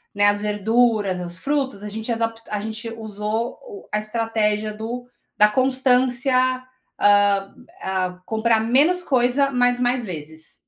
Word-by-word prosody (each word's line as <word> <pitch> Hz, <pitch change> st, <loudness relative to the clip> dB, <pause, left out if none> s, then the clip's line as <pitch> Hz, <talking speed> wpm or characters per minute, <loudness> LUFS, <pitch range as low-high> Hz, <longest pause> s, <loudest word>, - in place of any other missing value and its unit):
né, 205 Hz, 0 st, +3 dB
as 205 Hz, 0 st, +2 dB
verduras, 210 Hz, -2 st, +1 dB
as 175 Hz, 0 st, -5 dB
frutas, 270 Hz, -5 st, -1 dB
a 210 Hz, -, -5 dB
gente 220 Hz, +3 st, -5 dB
adapt 230 Hz, 0 st, -2 dB
a 210 Hz, -, -2 dB
gente 220 Hz, +2 st, -6 dB
usou 220 Hz, 0 st, -4 dB
o 430 Hz, -5 st, -11 dB
a 210 Hz, -, +1 dB
estratégia 215 Hz, -1 st, -1 dB
do 235 Hz, +3 st, -6 dB, 0.3 s
da 210 Hz, -, +7 dB
constância, 255 Hz, +1 st, +2 dB, 0.6 s
hã 205 Hz, -1 st, +3 dB, 0.3 s
hã, 185 Hz, -1 st, -2 dB
comprar 225 Hz, 0 st, +1 dB
menos 290 Hz, +11 st, +3 dB
coisa, 260 Hz, 0 st, +2 dB
mas 245 Hz, -1 st, +2 dB
mais 245 Hz, -1 st, 0 dB
vezes. 160 Hz, -3 st, -4 dB
225 Hz, 140 wpm, -22 LUFS, 205-245 Hz, 0.6 s, da